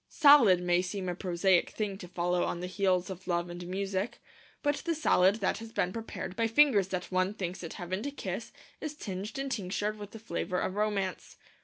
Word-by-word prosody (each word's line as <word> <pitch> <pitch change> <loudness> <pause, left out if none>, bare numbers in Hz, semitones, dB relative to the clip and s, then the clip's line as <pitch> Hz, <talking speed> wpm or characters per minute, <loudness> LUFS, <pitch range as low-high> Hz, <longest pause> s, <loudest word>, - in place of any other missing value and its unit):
Salad 280 - +7
may 175 0 +3
seem 185 +1 -4
a 180 - 0
prosaic 180 0 +2
thing 210 -3 -3
to 180 - -8
follow 175 0 0
on 170 - -2
the 180 - -4
heels 185 -1 +1
of 185 0 -9
Love 175 0 0
and 175 0 -7
Music; 195 +2 -2 0.4
but 290 0 +2
the 335 -1 -2
salad 195 -10 +4
that 205 -2 -1
has 225 0 -9
been 180 -4 0
prepared 220 -4 -5
by 230 0 +1
fingers 225 -5 +5
that 185 -1 -4
one 185 +2 +1
thinks 185 -2 -4
it 165 - -6
heaven 185 +3 -4
to 285 - -2
kiss 285 - -5 0.3
is 305 -1 -5
tinged 205 -4 -5
and 275 0 -3
tinctured 210 0 -2
with 205 -1 -7
the 225 - -10
flavour 210 -4 -3
of 185 - -1
romance. 200 -3 -2
190 Hz, 205 wpm, -30 LUFS, 180-220 Hz, 0.4 s, Salad